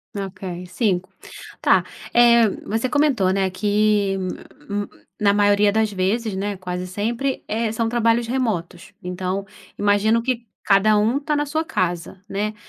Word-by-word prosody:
Ok, 195 -1 -6 0.3
5 185 -1 -1 0.5
tá, - - +4 0.3
eh, 235 -2 +6 0.2
você 225 +4 -1
comentou, 275 -10 +2
né, 190 0 +1
que 205 0 +1 1.0
na 200 -1 +5
maioria 205 0 +4
das 220 0 +1
vezes, 200 +3 -1
né 200 +1 -3
quase 180 0 -5
sempre, 235 +8 -2
eh, 220 0 -1
são 225 +1 -1
trabalhos 230 0 +2
remotos. 205 -9 -2
Então, 185 +2 -3 0.3
imagino 205 +3 +2
que 240 -2 -2 0.2
cada 210 +1 +4
um 225 +6 +2
está 300 +1 -1
na 295 - 0
sua 310 +3 -1
casa, 185 - -3
né. 210 +1 -2
210 Hz, 135 wpm, -22 LUFS, 195-230 Hz, 1.0 s, eh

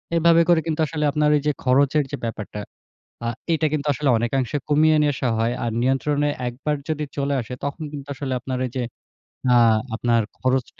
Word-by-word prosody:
এভাবে 170 0 +5
করে 170 -2 +6
কিন্তু 160 0 -2
আসলে 150 -1 -3
আপনার 150 0 +2
এই - - -2
যে - - +4
খরচের 140 +3 +3
যে - - -3
ব্যাপারটা 105 -2 -5 0.7
আ - - 0 0.3
এটা 155 0 +1
কিন্তু 150 -1 -1
আসলে 145 0 -1
অনেকাংশে 125 +3 -1
কমিয়ে 155 +1 +4
নিয়ে 145 -1 +2
আসা 130 -2 -1
হয়। 115 +2 +1
আর 115 - 0
নিয়ন্ত্রণে 145 +3 +1 0.2
১ 120 - -2
বার 150 -1 +1
যদি 150 -1 -1
চলে 140 0 0
আসে 120 +2 -6
তখন 145 +3 -4
কিন্তু 140 -1 -7
আসলে 135 -1 -4
আপনার 130 0 -4
এই - - -6
যে 125 - 0 0.7
আ - - +6 0.4
আপনার 115 0 +2 0.2
খরচ 130 0 +1
140 Hz, 195 wpm, -22 LUFS, 125-150 Hz, 0.7 s, করে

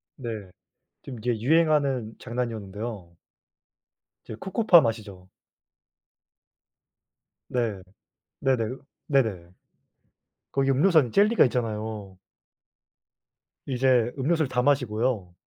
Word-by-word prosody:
네. 110 -7 -6 0.5
지금 125 -4 -8
이게 115 0 -1
유행하는 140 -5 +2
장난이었는데요. 110 -6 -5 1.1
이제 - - -8
코코팜 190 - +4
아시죠. 100 -5 -6 2.2
네. 115 -6 -2 0.6
네네. 125 -3 0 0.3
네네. 110 - 0 1.0
거기 135 0 +1
음료수 160 +6 +4
안에 130 -6 +2
젤리가 210 - +4
있잖아요. 110 -5 -4 1.5
이제 125 -3 +2
음료수를 155 +1 +1
다 125 -1 0
마시고요. 120 -7 0
120 Hz, 210 characters per minute, -26 LUFS, 110-135 Hz, 2.2 s, 코코팜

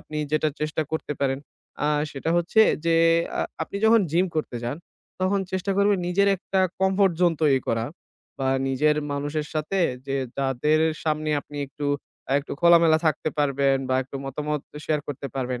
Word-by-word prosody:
আপনি 155 - -8 0.2
যেটা 155 0 +2
চেষ্টা 155 +1 -1
করতে 160 -2 -2
পারেন 135 -1 +1 0.5
আ - - +2 0.2
সেটা 145 +3 -3
হচ্ছে 175 +6 +3 0.2
যে, 165 - +3 0.4
আ - - +2 0.2
আপনি 200 - -5
যখন 225 +1 +6
gym 180 +3 +3
করতে 150 -5 -2
যান, 120 +5 -2 0.4
তখন 195 +1 +2
চেষ্টা 190 +1 -1
করবেন 200 -1 +3
নিজের 200 +3 +3
একটা 190 +1 -1 0.2
comfort 190 -1 +3
zone 175 -2 +4
তৈরি 135 -3 +4
করা 115 0 0 0.5
বা 135 -1 0 0.2
নিজের 150 +3 +2 0.2
মানুষের 145 +2 -2
সাথে 155 +6 -1 0.3
যে 135 0 -1 0.2
যাদের 140 +3 +1 0.2
সামনে 155 0 0
আপনি 145 - -12
একটু 145 +1 -5 0.4
আ - - +2
একটু 140 - -8
খোলামেলা 170 -2 +6
থাকতে 155 0 +1
পারবেন 140 -1 +2
বা 130 - +1
একটু 135 +1 -8
মতামত 150 +2 -3 0.2
শেয়ার 155 -1 0
করতে 140 0 -5
পারবেন। 125 -2 -2
155 Hz, 170 wpm, -24 LUFS, 140-175 Hz, 0.5 s, যখন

